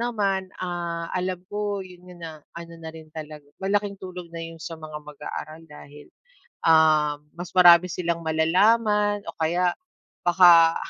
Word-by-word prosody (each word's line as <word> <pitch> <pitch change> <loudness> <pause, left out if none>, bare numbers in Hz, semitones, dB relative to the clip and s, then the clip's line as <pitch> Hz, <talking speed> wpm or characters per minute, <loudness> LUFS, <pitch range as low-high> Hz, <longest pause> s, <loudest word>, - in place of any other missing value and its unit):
naman, 205 -5 0 0.2
ah, 170 -2 -4
alam 185 0 -2
ko 205 0 -3
yun 180 0 -15
yung 175 -1 -14
na 155 -2 -9 0.2
ano 170 0 -10
na 160 - -7
rin 160 -1 -12
talaga, 155 -2 -8 0.2
malaking 200 +1 0
tulong 180 -2 -9
na 165 - -5
yun 165 0 -8
sa 165 +1 -7
mga 155 -1 -8
mag-aaral 150 +2 -8
dahil, 145 0 -13 0.5
ah, 155 -2 +4 0.2
mas 175 +1 -7
marami 175 0 +8
silang 170 -1 -2
malalaman 205 +6 +2
o 165 - -5
kaya 175 +2 +1 0.5
baka, 170 -2 +6
170 Hz, 150 wpm, -24 LUFS, 160-185 Hz, 0.5 s, marami